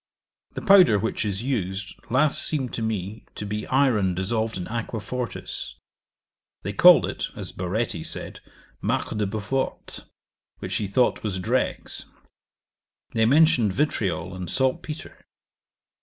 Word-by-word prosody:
The -, -, -5 dB
powder 195 Hz, -, +7 dB
which 115 Hz, +3 st, -1 dB
is 100 Hz, 0 st, -2 dB
used 100 Hz, -7 st, -2 dB, 0.2 s
last 140 Hz, +4 st, +3 dB
seemed 135 Hz, -5 st, -1 dB
to -, -, -3 dB
me 110 Hz, -1 st, -3 dB
to 105 Hz, -, -5 dB
be 105 Hz, +1 st, -4 dB
iron 120 Hz, -9 st, +2 dB
dissolved 110 Hz, +4 st, -1 dB
in 90 Hz, -, -5 dB
aqua 115 Hz, 0 st, -3 dB
fortis: 125 Hz, +3 st, -5 dB, 0.9 s
they -, -, -3 dB
called -, -, +8 dB
it, -, -, -3 dB
as -, -, -5 dB
Baretti 90 Hz, -1 st, -2 dB
said, -, -, -6 dB, 0.4 s
marc -, -, -1 dB
de 105 Hz, -1 st, 0 dB
beau 110 Hz, +2 st, -3 dB
forte, 130 Hz, +7 st, -3 dB, 0.6 s
which -, -, -3 dB
he 105 Hz, -, -2 dB
thought 125 Hz, +6 st, +2 dB
was 100 Hz, -4 st, -2 dB
dregs. 90 Hz, -, -2 dB, 1.1 s
They 110 Hz, -1 st, +3 dB
mentioned 140 Hz, -, +4 dB
vitriol 95 Hz, -, -1 dB
and 90 Hz, -2 st, -6 dB
salt 130 Hz, +4 st, +1 dB
petre. 150 Hz, 0 st, -8 dB
110 Hz, 140 wpm, -25 LUFS, 95-130 Hz, 1.1 s, called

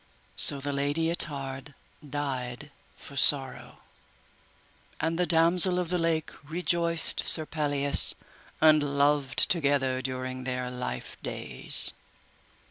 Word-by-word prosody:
So 140 Hz, -, +5 dB
the 140 Hz, +1 st, -4 dB
Lady 145 Hz, +4 st, -1 dB
Ettard 140 Hz, -3 st, -1 dB, 0.3 s
died 140 Hz, -2 st, -5 dB, 0.3 s
for 140 Hz, -, -13 dB
sorrow, 135 Hz, -1 st, +1 dB, 1.2 s
and 165 Hz, +1 st, -2 dB
the 180 Hz, -, 0 dB
Damosel 170 Hz, +3 st, +4 dB
of 180 Hz, -2 st, -3 dB
the 180 Hz, 0 st, -1 dB
Lake 165 Hz, -2 st, -1 dB
rejoiced 170 Hz, +1 st, 0 dB
Sir 155 Hz, -, +4 dB
Pelleas, 145 Hz, -2 st, +1 dB, 0.4 s
and 155 Hz, -1 st, +5 dB, 0.2 s
loved 140 Hz, -3 st, +1 dB
together 140 Hz, -5 st, 0 dB
during 130 Hz, 0 st, -6 dB
their 125 Hz, -1 st, -4 dB
life 125 Hz, -, -7 dB
days. -, -, +1 dB
145 Hz, 110 wpm, -27 LUFS, 135-165 Hz, 1.2 s, So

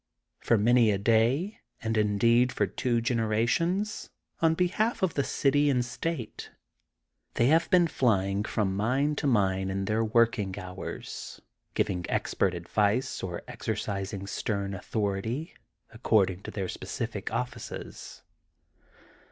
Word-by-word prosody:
For 115 Hz, -, +2 dB
many 115 Hz, +2 st, +4 dB
a 100 Hz, -, +2 dB
day, 120 Hz, -, +2 dB, 0.2 s
and 115 Hz, 0 st, -1 dB
indeed 115 Hz, +4 st, +3 dB
for -, -, +1 dB
two 120 Hz, -3 st, -1 dB
generations, 120 Hz, -, 0 dB, 0.3 s
on 165 Hz, -1 st, +4 dB
behalf 195 Hz, +6 st, 0 dB
of 185 Hz, -, +2 dB
the 140 Hz, -, +1 dB
city 145 Hz, +2 st, +2 dB
and 125 Hz, -3 st, +2 dB
state, 130 Hz, -2 st, -4 dB, 0.9 s
they 120 Hz, -, +3 dB
have 165 Hz, +2 st, +3 dB
been 180 Hz, -1 st, +5 dB
flying 100 Hz, -8 st, +1 dB
from 100 Hz, -3 st, -1 dB
mine 130 Hz, +8 st, +1 dB
to -, -, 0 dB
mine 95 Hz, -6 st, +2 dB
in 95 Hz, 0 st, -2 dB
their 110 Hz, +2 st, +1 dB
working 110 Hz, -4 st, +2 dB
hours, 90 Hz, -1 st, -7 dB, 0.4 s
giving 90 Hz, -3 st, 0 dB
expert 95 Hz, -2 st, 0 dB
advice 105 Hz, +9 st, 0 dB
or 90 Hz, -2 st, -5 dB
exercising 100 Hz, -4 st, -4 dB
stem 100 Hz, 0 st, -2 dB
authority, 110 Hz, -, -2 dB, 0.4 s
accord 110 Hz, -4 st, +3 dB
ing 90 Hz, +1 st, -9 dB
to -, -, -8 dB
their 95 Hz, -3 st, -3 dB
specific -, -, -5 dB
oflSces. 125 Hz, 0 st, -5 dB
115 Hz, 125 wpm, -28 LUFS, 100-130 Hz, 0.9 s, been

